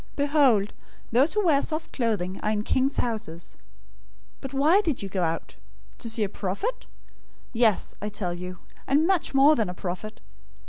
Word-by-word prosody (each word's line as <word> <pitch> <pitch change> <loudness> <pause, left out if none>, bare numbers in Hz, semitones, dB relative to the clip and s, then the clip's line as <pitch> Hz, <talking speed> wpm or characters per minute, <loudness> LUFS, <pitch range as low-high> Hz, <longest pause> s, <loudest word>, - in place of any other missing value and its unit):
Behold, 280 -8 +3 0.4
those 265 - +3
who 420 -2 +1
wear 290 -5 +4
soft 315 0 -3
clothing 205 -7 -1
are 210 - -1
in 210 -1 0
king's 265 +4 +1
houses. 175 - -3 0.8
011:009 - - -37
But 270 0 -7
why 315 +9 +5
did 315 - -2
you 195 - -5
go 190 -1 -2
out? 165 -1 -3 0.4
To 230 - -3
see 225 -1 +1
a - - +1
prophet? 210 - -4 0.7
Yes, 225 -3 +2
I 210 - -3
tell 180 -4 -3
you, 180 +1 -7 0.3
and 290 +4 +3
much 360 -6 +1
more 285 +3 +6
than 220 -8 0
a 180 - -6
prophet. 185 +4 -6
230 Hz, 175 wpm, -26 LUFS, 195-285 Hz, 0.8 s, more